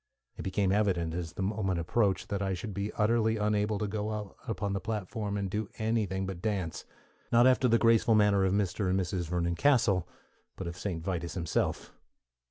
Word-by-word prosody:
It -, -, -7 dB
became 95 Hz, 0 st, 0 dB
evident 95 Hz, -6 st, +1 dB
as 85 Hz, -1 st, -4 dB
the 95 Hz, -, -3 dB
moment 95 Hz, -3 st, -1 dB
approached 95 Hz, +2 st, 0 dB
that 100 Hz, -1 st, -2 dB
I 95 Hz, -1 st, 0 dB
should 105 Hz, +3 st, -6 dB
be 100 Hz, +2 st, -3 dB
utterly 110 Hz, +1 st, +2 dB
unable 105 Hz, 0 st, +1 dB
to 105 Hz, -, -1 dB
go 105 Hz, +1 st, -3 dB
out 105 Hz, -3 st, -6 dB
upon 105 Hz, -3 st, -2 dB
the 100 Hz, -, -1 dB
platform 105 Hz, 0 st, -3 dB
and 100 Hz, -1 st, -1 dB
do 105 Hz, +2 st, -3 dB
anything 105 Hz, -4 st, 0 dB
but 95 Hz, -2 st, -6 dB
dance: 100 Hz, -6 st, -2 dB, 0.5 s
not 120 Hz, +1 st, +6 dB
after 130 Hz, 0 st, +4 dB
the 115 Hz, -1 st, +4 dB
graceful 115 Hz, 0 st, +4 dB
manner 105 Hz, -2 st, +4 dB
of 95 Hz, -, +2 dB
Mr. 100 Hz, 0 st, 0 dB
and 95 Hz, +1 st, +2 dB
Mrs. 90 Hz, -2 st, -2 dB
Vernon 85 Hz, -1 st, 0 dB
Castle, 115 Hz, -, +3 dB, 0.5 s
but 95 Hz, -, -6 dB
of 85 Hz, 0 st, -5 dB
Saint 90 Hz, -3 st, -4 dB
Vitus 85 Hz, -1 st, -3 dB
himself. 85 Hz, -3 st, -1 dB
100 Hz, 190 wpm, -30 LUFS, 95-110 Hz, 0.5 s, not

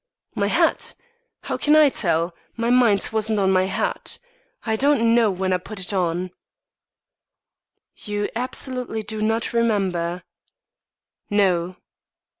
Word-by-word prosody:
"My -, -, 0 dB
hat? -, -, +1 dB, 0.5 s
How -, -, -3 dB
can 300 Hz, +1 st, +3 dB
I 305 Hz, -2 st, +7 dB
tell? 170 Hz, -6 st, 0 dB, 0.2 s
My 230 Hz, +1 st, 0 dB
mind 235 Hz, -6 st, +4 dB
wasn't 220 Hz, 0 st, +1 dB
on 190 Hz, -1 st, +2 dB
my 185 Hz, 0 st, +3 dB
hat. 190 Hz, -, -2 dB, 0.5 s
I 220 Hz, -1 st, 0 dB
don't 230 Hz, -3 st, +3 dB
know 230 Hz, -2 st, +4 dB
when 185 Hz, 0 st, -1 dB
I -, -, +3 dB
put 210 Hz, +3 st, -9 dB
it 185 Hz, +2 st, -4 dB
on." 180 Hz, -1 st, -1 dB, 1.7 s
"You 205 Hz, 0 st, -3 dB
absolutely 250 Hz, -2 st, -2 dB
do 215 Hz, +1 st, -5 dB
not 225 Hz, +2 st, 0 dB
remember?" 185 Hz, -7 st, 0 dB, 1.1 s
"No." 185 Hz, -3 st, +1 dB
210 Hz, 125 wpm, -22 LUFS, 185-230 Hz, 1.7 s, I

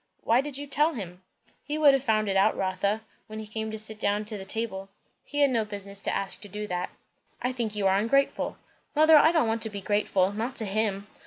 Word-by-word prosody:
"Why 235 Hz, +3 st, +4 dB
did 280 Hz, -1 st, -6 dB
you 285 Hz, -, -5 dB
tell 295 Hz, +3 st, +1 dB
him?" 180 Hz, -5 st, -7 dB, 0.4 s
"He 300 Hz, +1 st, -3 dB
would 295 Hz, -3 st, +6 dB
have 270 Hz, -1 st, +1 dB
found 215 Hz, -3 st, +1 dB
it 195 Hz, -, 0 dB
out, 195 Hz, +3 st, +3 dB
Rotha, 195 Hz, +3 st, 0 dB, 0.3 s
when 215 Hz, -1 st, -8 dB
he 220 Hz, -, -6 dB
came 220 Hz, +1 st, -4 dB
to 220 Hz, -, -5 dB
sit 215 Hz, 0 st, -1 dB
down 205 Hz, 0 st, 0 dB
to 215 Hz, 0 st, -5 dB
the 190 Hz, -, -7 dB
table." 195 Hz, -2 st, -4 dB, 0.3 s
"He 290 Hz, 0 st, -2 dB
had 280 Hz, -2 st, +5 dB
no 230 Hz, -3 st, +2 dB
business 200 Hz, -1 st, -7 dB
to -, -, -1 dB
ask 195 Hz, -1 st, -3 dB
to 205 Hz, -, -9 dB
do 210 Hz, +2 st, -5 dB
that." 180 Hz, -2 st, -3 dB, 0.5 s
"I 250 Hz, -, -1 dB
think 230 Hz, -4 st, -3 dB
you 205 Hz, -1 st, -1 dB
are 190 Hz, 0 st, +4 dB
ungrateful." 275 Hz, +6 st, +1 dB, 0.4 s
"Mother, 310 Hz, +1 st, +7 dB
I 310 Hz, +2 st, +7 dB
don't 320 Hz, -8 st, +2 dB
want 225 Hz, 0 st, -1 dB
to 220 Hz, -, -1 dB
be 205 Hz, -1 st, -6 dB
grateful. 200 Hz, -1 st, +1 dB
Not 230 Hz, +5 st, -3 dB
to 220 Hz, -, 0 dB
him." 200 Hz, -1 st, -1 dB
215 Hz, 240 wpm, -27 LUFS, 200-255 Hz, 0.5 s, Mother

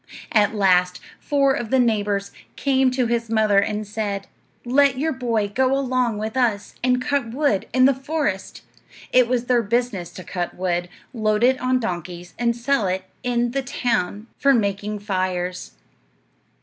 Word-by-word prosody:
At 215 Hz, -1 st, +3 dB
last, 180 Hz, -2 st, +3 dB, 0.2 s
four 275 Hz, -2 st, +2 dB
of 240 Hz, -5 st, -3 dB
the 265 Hz, -, +3 dB
neighbors 205 Hz, -4 st, +1 dB, 0.2 s
came 265 Hz, -2 st, +2 dB
to 255 Hz, 0 st, 0 dB
his 230 Hz, -1 st, -1 dB
mother 215 Hz, -3 st, +3 dB
and 210 Hz, +1 st, -1 dB
said, 205 Hz, -1 st, -3 dB, 0.4 s
"Let 270 Hz, +1 st, +3 dB
your 315 Hz, +4 st, 0 dB
boy 230 Hz, -5 st, -1 dB
go 260 Hz, +5 st, +1 dB
along 255 Hz, -4 st, 0 dB
with 220 Hz, +2 st, -4 dB
us 225 Hz, -6 st, 0 dB
and 250 Hz, 0 st, +3 dB
cut 255 Hz, -1 st, -1 dB
wood 280 Hz, -9 st, +1 dB
in 255 Hz, 0 st, +4 dB
the 275 Hz, -, +5 dB
forest." 270 Hz, -7 st, -3 dB, 0.5 s
It 250 Hz, -1 st, +5 dB
was 245 Hz, -1 st, 0 dB
their 245 Hz, -1 st, +3 dB
business 215 Hz, -5 st, -1 dB
to 185 Hz, -, -9 dB
cut 175 Hz, -1 st, -4 dB
wood, 175 Hz, -1 st, -1 dB, 0.2 s
load 215 Hz, -1 st, 0 dB
it 255 Hz, +1 st, +3 dB
on 255 Hz, 0 st, +2 dB
donkeys, 175 Hz, -4 st, -5 dB
and 235 Hz, -1 st, +1 dB
sell 240 Hz, -3 st, 0 dB
it 185 Hz, +1 st, -1 dB, 0.2 s
in 240 Hz, -1 st, 0 dB
the 275 Hz, +2 st, -1 dB
town 225 Hz, -6 st, -2 dB
for 275 Hz, -1 st, +4 dB
making 205 Hz, -1 st, -1 dB
fires. 185 Hz, -2 st, -2 dB
230 Hz, 160 wpm, -22 LUFS, 200-255 Hz, 0.5 s, the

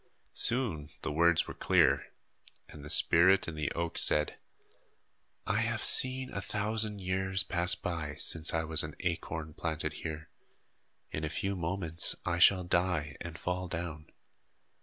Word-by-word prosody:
Soon 105 Hz, -, +3 dB
the 80 Hz, -, -3 dB
words 85 Hz, +2 st, +2 dB
were -, -, -7 dB
clear, 70 Hz, +2 st, +2 dB, 0.6 s
and 75 Hz, -2 st, -12 dB
the 75 Hz, -, -9 dB
spirit 95 Hz, +6 st, +5 dB
in 85 Hz, -, -5 dB
the 75 Hz, -2 st, -3 dB
oak 85 Hz, 0 st, -3 dB
said: 75 Hz, 0 st, +1 dB, 1.1 s
"I 95 Hz, -, -1 dB
have 115 Hz, 0 st, -2 dB
seen 130 Hz, 0 st, +4 dB
a 100 Hz, -, -4 dB
thousand 105 Hz, 0 st, -2 dB
years 95 Hz, 0 st, 0 dB
pass 90 Hz, -1 st, +1 dB
by, 80 Hz, -4 st, -5 dB
since 80 Hz, 0 st, +2 dB
I 80 Hz, 0 st, -1 dB
was 80 Hz, 0 st, 0 dB
an 75 Hz, -1 st, -7 dB
acorn 80 Hz, -3 st, -4 dB
planted 80 Hz, -1 st, -3 dB
here. 80 Hz, -1 st, -7 dB, 0.8 s
In 75 Hz, -, -5 dB
a 80 Hz, -, -2 dB
few 100 Hz, +6 st, -3 dB
moments 85 Hz, -1 st, 0 dB
I 85 Hz, -1 st, -1 dB
shall 90 Hz, +1 st, +5 dB
die 85 Hz, -5 st, -1 dB
and 85 Hz, -2 st, -7 dB
fall 90 Hz, 0 st, -4 dB
down. 85 Hz, -3 st, -6 dB
85 Hz, 150 wpm, -30 LUFS, 80-95 Hz, 1.1 s, spirit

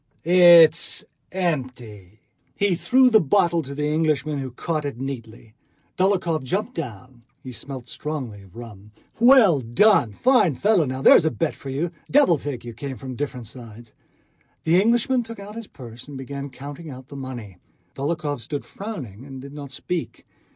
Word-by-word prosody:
"It's 170 Hz, -2 st, +6 dB, 0.3 s
empty." 125 Hz, -, -4 dB, 0.3 s
He 200 Hz, -2 st, +1 dB
threw 250 Hz, +8 st, +3 dB
the 220 Hz, -2 st, +6 dB
bottle 170 Hz, +1 st, +2 dB
to 140 Hz, -1 st, -8 dB
the 150 Hz, +1 st, -2 dB
Englishman, 150 Hz, -1 st, 0 dB
who 135 Hz, -1 st, -4 dB
caught 155 Hz, +5 st, -3 dB
it 140 Hz, -4 st, -5 dB
neatly. 115 Hz, -5 st, -7 dB, 0.4 s
Dólokhov 185 Hz, -4 st, +1 dB
jumped 200 Hz, -, -3 dB
down. 125 Hz, -, -8 dB, 0.2 s
He 130 Hz, -, -8 dB
smelt 130 Hz, 0 st, -8 dB
strongly 130 Hz, -8 st, -5 dB
of 95 Hz, -2 st, -18 dB
rum. 105 Hz, -3 st, -11 dB, 0.3 s
"Well 235 Hz, -, +6 dB
done!... 125 Hz, -, +3 dB
Fine 220 Hz, -, +3 dB
fellow!... 150 Hz, -, +1 dB
There's -, -, +7 dB
a -, -, +4 dB
bet 165 Hz, 0 st, -2 dB
for 135 Hz, -, -9 dB
you!... 150 Hz, +6 st, -2 dB, 0.2 s
Devil 245 Hz, -, +4 dB
take 135 Hz, -4 st, -6 dB
you!" 120 Hz, -, -7 dB
came 130 Hz, +3 st, -6 dB
from 130 Hz, -2 st, -7 dB
different 125 Hz, -3 st, -5 dB
sides. 115 Hz, -1 st, -12 dB, 0.7 s
The 170 Hz, +4 st, +4 dB
Englishman 240 Hz, +4 st, +2 dB
took 230 Hz, -2 st, -9 dB
out 205 Hz, +2 st, -9 dB
his 230 Hz, -2 st, -7 dB
purse 120 Hz, -1 st, -12 dB
and 145 Hz, -2 st, -8 dB
began 140 Hz, +1 st, -6 dB
counting 145 Hz, +5 st, -9 dB
out 130 Hz, 0 st, -11 dB
the 140 Hz, -, -10 dB
money. 120 Hz, -8 st, -8 dB, 0.4 s
Dólokhov 145 Hz, 0 st, -3 dB
stood 140 Hz, +5 st, -5 dB
frowning 135 Hz, -, -8 dB
and 135 Hz, -1 st, -9 dB
did 140 Hz, +2 st, -10 dB
not 145 Hz, -2 st, -8 dB
speak. 165 Hz, +5 st, -5 dB
145 Hz, 165 wpm, -23 LUFS, 125-175 Hz, 0.7 s, There's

